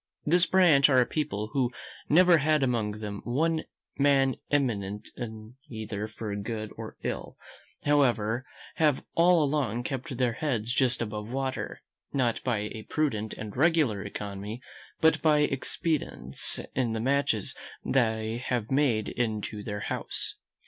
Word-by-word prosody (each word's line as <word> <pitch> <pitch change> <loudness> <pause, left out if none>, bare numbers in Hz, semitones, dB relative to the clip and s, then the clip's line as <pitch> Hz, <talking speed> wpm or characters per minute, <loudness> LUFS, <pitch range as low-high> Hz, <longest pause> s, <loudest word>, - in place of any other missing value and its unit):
This 175 +3 +4
branch 165 -7 +6
are 130 -2 +5
a 125 - +5
people 110 -8 -2
who 130 -4 +1 0.4
never 175 +1 +6
had 155 0 +3
among 110 -4 0
them 100 -1 -5
one 160 +6 0 0.3
man 135 -2 +4
eminent 105 -7 -1 0.6
either 110 -2 -4
for 110 -1 -5
good 110 +1 -4
or - - -8
ill: - - -4 0.5
however, 120 -5 +2 0.3
have 150 -4 +3
all 170 -1 +5
along 135 -5 0
kept 130 -1 -4
their 125 -2 +2
heads 120 -4 -1
just 125 -3 +2
above 105 -1 -5
water, 135 +1 -3 0.3
not 125 -4 0
by 110 -5 0
a 110 -1 -8
prudent 110 -9 -1
and 110 -2 -7
regular 145 -8 +3
economy, 105 +2 -5 0.4
but 160 0 +4
by 150 -2 +4
expedients 145 - -1
in 125 -3 0
the 110 - -2
matches 130 -4 +1 0.3
they 110 -2 +1
have 120 -3 -2
made 130 -6 +2
in 110 -3 -1
to 105 0 -5
their 105 -1 -4
house. - - -3
125 Hz, 140 wpm, -28 LUFS, 110-145 Hz, 0.6 s, branch